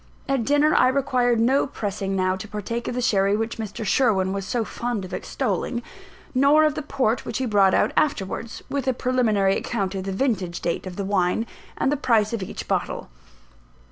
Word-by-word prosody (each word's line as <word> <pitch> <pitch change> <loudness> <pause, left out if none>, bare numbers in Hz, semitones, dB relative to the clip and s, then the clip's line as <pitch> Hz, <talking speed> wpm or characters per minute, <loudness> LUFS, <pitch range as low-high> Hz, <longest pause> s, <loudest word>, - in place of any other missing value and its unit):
At 270 -4 0
dinner, 290 +3 +3
I 255 - +5
required 250 -3 +2
no 260 +5 +3
pressing 200 -5 -3
now 185 0 +1
to 190 +3 -7
partake 215 +3 -4
of - - -3
the 250 - -1
sherry 200 -3 +3
which 225 +1 -3
Mr. 215 0 -5
Sherwin 195 -6 +2
was 195 -1 -4
so 235 0 -1
fond 235 -5 -3
of 185 - -10
extolling, 240 -1 -2 0.5
nor 280 +4 +5
of 305 -1 +3
the 305 - -4
port 260 -5 0
which - - -4
he 260 - -1
brought 200 -4 +4
out - - +2
afterwards, 230 -4 -1
with 280 -2 -3
a 260 - +3
preliminary 225 -6 +2
account 200 -5 -2
of 190 -1 -4
the 195 - -2
vintage 190 -6 -1
date 170 +2 -2
of 180 - -7
the 200 - -3
wine, 190 +2 +1 0.3
and 270 - +1
the 295 - +1
price 225 -5 +2
of 230 - -2
each 185 - -6
bottle. - - -2
225 Hz, 200 wpm, -24 LUFS, 195-255 Hz, 0.5 s, I